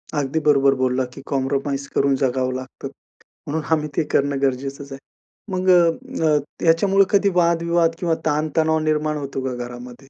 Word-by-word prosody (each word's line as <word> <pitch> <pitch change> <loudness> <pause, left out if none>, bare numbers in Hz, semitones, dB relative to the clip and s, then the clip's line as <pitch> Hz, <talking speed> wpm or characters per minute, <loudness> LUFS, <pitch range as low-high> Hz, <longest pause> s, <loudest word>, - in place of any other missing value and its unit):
अगदी 145 +2 -1
बरोबर 140 -2 +4
बोलला 130 0 +1
की 135 - -10
कॉम्प्रोमाईज 140 0 -2
करून 140 -1 +3
जगावं 130 -1 0
लागतं. 130 +1 -7 0.6
म्हणून 155 +1 -3
आम्ही 150 -1 +1
ते - - +3
करणं 140 0 +1
गरजेचंच 135 +1 -2
आहे. 135 - -7 0.5
मग 185 0 -1
अ, 175 -1 +7 0.4
अ, 150 - +4 0.3
ह्याच्यामुळे 195 +4 +4
कधी 200 0 +3
वादविवाद 170 -1 +2
किंवा 170 -3 0
ताणतणाव 155 +1 +1
निर्माण 155 0 0
होतो 140 -2 -5
का 125 - -2
घरामध्ये? 120 0 -9
145 Hz, 155 wpm, -21 LUFS, 135-165 Hz, 0.6 s, अ